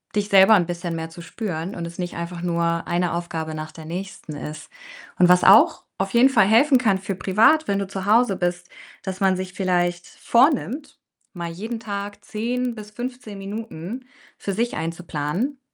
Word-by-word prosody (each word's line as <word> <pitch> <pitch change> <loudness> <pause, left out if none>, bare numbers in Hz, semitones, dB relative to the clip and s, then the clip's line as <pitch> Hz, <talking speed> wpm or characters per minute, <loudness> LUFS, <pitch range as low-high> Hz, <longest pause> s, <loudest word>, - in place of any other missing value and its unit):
dich 205 0 0
selber 195 +2 +7
'n 180 -4 +3
bisschen 175 0 -4
mehr 160 0 -4
zu 165 +1 -11
spüren 180 -1 -5
und 170 - -4
es 170 +1 -11
nicht 180 -1 -4
einfach 170 +1 -5
nur 170 -1 0
eine 175 0 0
Aufgabe 165 -2 -4
nach 155 0 -6
der 160 0 -11
nächsten 175 -2 -6
ist 150 +1 -8 0.5
und 180 - +6
was 180 0 +6
auch 200 +4 +6
auf 190 0 -1
jeden 245 +3 +6
Fall 220 -7 +4
helfen 260 +6 +5
kann 215 -6 +2
für 195 0 -4
privat, 220 - +3
wenn 200 0 +1
du 200 - -3
zu 190 0 -5
Hause 220 0 +4
bist, 175 0 -2 0.3
dass 190 -1 -5
man 190 -1 +3
sich 185 0 -5
vielleicht 175 -2 0
vornimmt, 275 +2 +1 0.3
mal 170 -3 -5
jeden 220 +7 -5
Tag 205 -2 -6
10 240 +2 -2
bis 210 -1 -10
15 245 -2 -6
Minuten 210 +2 -6 0.3
für 200 - -4
sich 235 +4 -1
einzuplanen 165 - -3
190 Hz, 185 wpm, -23 LUFS, 175-220 Hz, 0.5 s, selber